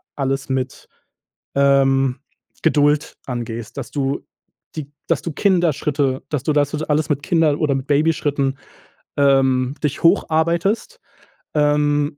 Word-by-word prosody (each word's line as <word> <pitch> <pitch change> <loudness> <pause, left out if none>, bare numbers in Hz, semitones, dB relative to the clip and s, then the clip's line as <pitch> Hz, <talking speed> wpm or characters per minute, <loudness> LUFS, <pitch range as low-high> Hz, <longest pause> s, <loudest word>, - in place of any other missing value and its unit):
alles 135 -1 -2
mit, 130 -1 -3 0.7
ähm, 135 -1 +3 0.4
Geduld 150 -2 +2
angehst, 115 -2 -5
dass - - -6
du 140 -1 -2 0.5
die 145 -3 -6 0.2
dass 165 -6 +1
du 165 - -4
Kinderschritte 150 -7 +1
dass 145 -4 -2
du 155 - +1
das 145 +1 +1
alles 150 0 0
mit 145 -1 0
Kinder 160 -4 +2
oder 145 -3 +2
mit 135 0 -3
Babyschritten, 145 -2 +1 0.6
ähm, 135 -2 +3
dich 145 0 -2
hocharbeitest, 170 - +1 0.6
ähm, 145 0 +2
145 Hz, 120 wpm, -20 LUFS, 135-155 Hz, 0.7 s, ähm